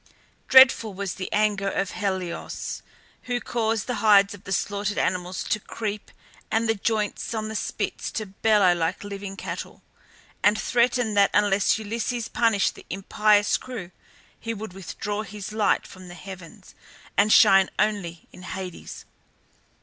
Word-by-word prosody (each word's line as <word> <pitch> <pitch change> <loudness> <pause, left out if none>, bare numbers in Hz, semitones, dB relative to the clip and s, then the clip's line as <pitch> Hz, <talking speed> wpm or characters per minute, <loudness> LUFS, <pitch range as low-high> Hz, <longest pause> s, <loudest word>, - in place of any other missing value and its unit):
Dreadful 260 -6 +6
was 200 -1 -3
the 185 - -6
anger 205 -2 +1
of 195 -1 -2
Helios, 190 -4 -4 0.5
who 245 0 0
caused 225 -3 -1
the 250 -3 -3
hides 200 -2 +5
of 205 -1 -13
the 195 - -7
slaughtered 205 +2 -1
animals 180 0 -1
to 210 - -1
creep 210 0 -5 0.4
and 225 +1 +1
the 225 - +3
joints 215 +1 -2
on 215 0 -3
the 220 - -6
spits - - -3
to 215 - -3
bellow 200 -1 +3
like 165 +1 -2
living 200 -1 -7
cattle, - - -7 0.6
and 210 +1 +4
threatened 240 -2 +1
that 200 0 +6
unless 205 -1 +3
Zeus 230 +2 -3
punished 225 -4 +2
the - - -15
impious 205 +2 +2
crew 225 -9 -8 0.5
he 230 0 -4
would 215 -2 -7
withdraw 205 +3 -4
his 210 -1 -7
light 215 -1 +1
from 185 -1 -12
the 175 - -10
heavens 185 +2 -11 0.4
and 210 +1 +3
shine 195 -2 +7
only 200 -6 -1
in - - -13
Hades. 185 -1 -7
205 Hz, 150 wpm, -25 LUFS, 195-220 Hz, 0.6 s, shine